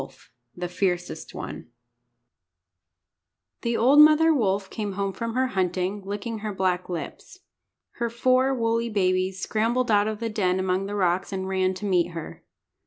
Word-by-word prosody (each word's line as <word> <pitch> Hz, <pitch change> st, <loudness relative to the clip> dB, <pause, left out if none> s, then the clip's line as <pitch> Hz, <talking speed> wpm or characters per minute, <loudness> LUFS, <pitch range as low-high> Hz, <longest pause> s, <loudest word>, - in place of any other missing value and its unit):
_] 135 Hz, -1 st, -11 dB, 0.4 s
THE 180 Hz, 0 st, -4 dB
FIERCEST 180 Hz, 0 st, -3 dB
ONE -, -, -7 dB, 1.9 s
THE 235 Hz, 0 st, -1 dB
old 270 Hz, +5 st, +5 dB
mother 310 Hz, +2 st, +7 dB
wolf 200 Hz, -7 st, 0 dB
came 210 Hz, -3 st, -4 dB
home 195 Hz, 0 st, -2 dB
from 230 Hz, +2 st, -4 dB
her 260 Hz, 0 st, +1 dB
hunting, 185 Hz, 0 st, -1 dB
licking 205 Hz, +3 st, -4 dB
her 210 Hz, 0 st, -4 dB
black 185 Hz, -2 st, -1 dB
lips. 175 Hz, -2 st, -7 dB, 0.6 s
Her 235 Hz, 0 st, -1 dB
four 255 Hz, +3 st, +2 dB
woolly 230 Hz, -2 st, 0 dB
babies 185 Hz, -2 st, 0 dB
scrambled 230 Hz, +5 st, 0 dB
out 205 Hz, 0 st, +4 dB
of 215 Hz, -1 st, -3 dB
the 230 Hz, -, -2 dB
den 190 Hz, -4 st, 0 dB
among 185 Hz, +1 st, 0 dB
the 205 Hz, -, -4 dB
rocks, 185 Hz, -1 st, 0 dB
and 190 Hz, -1 st, -3 dB
ran 190 Hz, 0 st, 0 dB
to 205 Hz, -, -6 dB
meet 175 Hz, -3 st, +1 dB
her. 165 Hz, -2 st, -8 dB
200 Hz, 160 wpm, -25 LUFS, 185-230 Hz, 1.9 s, mother